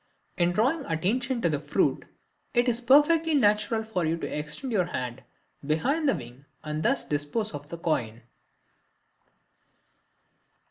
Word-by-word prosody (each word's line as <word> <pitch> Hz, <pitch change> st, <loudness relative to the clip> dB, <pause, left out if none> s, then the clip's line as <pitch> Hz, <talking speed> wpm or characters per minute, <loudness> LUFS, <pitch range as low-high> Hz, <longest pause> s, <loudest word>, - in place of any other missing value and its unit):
In 175 Hz, 0 st, +2 dB
drawing 260 Hz, -, +1 dB
attention 235 Hz, +10 st, -1 dB
to 170 Hz, -, +3 dB
the 150 Hz, -2 st, -1 dB
fruit 145 Hz, 0 st, 0 dB, 0.5 s
it 240 Hz, +1 st, +3 dB
is 240 Hz, 0 st, +1 dB
perfectly 300 Hz, +5 st, +4 dB
natural 215 Hz, -2 st, +2 dB
for 220 Hz, -5 st, -2 dB
you 160 Hz, +1 st, 0 dB
to -, -, -5 dB
extend 155 Hz, -, -4 dB
your 185 Hz, -4 st, +2 dB
hand 125 Hz, -7 st, -5 dB, 0.4 s
behind 270 Hz, -, +1 dB
the -, -, +2 dB
wing 125 Hz, 0 st, -10 dB, 0.2 s
and 150 Hz, 0 st, -3 dB
thus -, -, +1 dB
dispose 150 Hz, +10 st, -2 dB
of 145 Hz, 0 st, -8 dB
the 170 Hz, -, -6 dB
coin. 120 Hz, -9 st, -2 dB
180 Hz, 140 wpm, -27 LUFS, 150-245 Hz, 0.5 s, perfectly